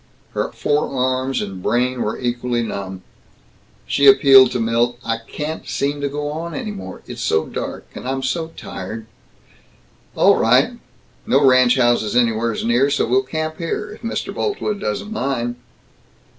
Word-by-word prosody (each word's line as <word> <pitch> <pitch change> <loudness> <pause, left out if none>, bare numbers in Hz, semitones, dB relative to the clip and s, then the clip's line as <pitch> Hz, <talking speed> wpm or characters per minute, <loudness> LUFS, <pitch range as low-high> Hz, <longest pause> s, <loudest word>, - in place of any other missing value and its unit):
Her - - -2
forearms 130 -3 0
and 95 -2 -7
brain 125 +4 0
were 105 - -2
equally 120 -1 -1
numb. 95 -4 -5 0.8
She 140 - +3
appealed 135 -1 +8
to 125 - -1
Milt, 115 +1 +1
"I 115 0 -1
can't 155 +1 -5
seem 145 +1 -1
to 140 - -1
go 145 +1 -3
on 165 +2 -5
any 230 -5 -4
more. 200 - -8
It's - - -7
so 80 0 +1
dark, - - -5
and - - -8
I'm 135 0 -2
so 160 +5 -1
tired 110 +4 -7 0.6
" - - -34
"All - - +5
right. - - +3 0.5
No 140 +1 +4
ranch 130 -1 +5
houses 120 -3 +2
anywheres 115 -2 +1
near, 120 +4 +3
so 145 - +1
we'll 125 +3 +3
camp 155 +3 -4
here, 210 +5 -3
if 210 - -12
Mr. 230 - -3
Boltwood 310 - -2
doesn't 155 - -3
mind." 125 - -2
130 Hz, 155 wpm, -20 LUFS, 120-145 Hz, 0.8 s, appealed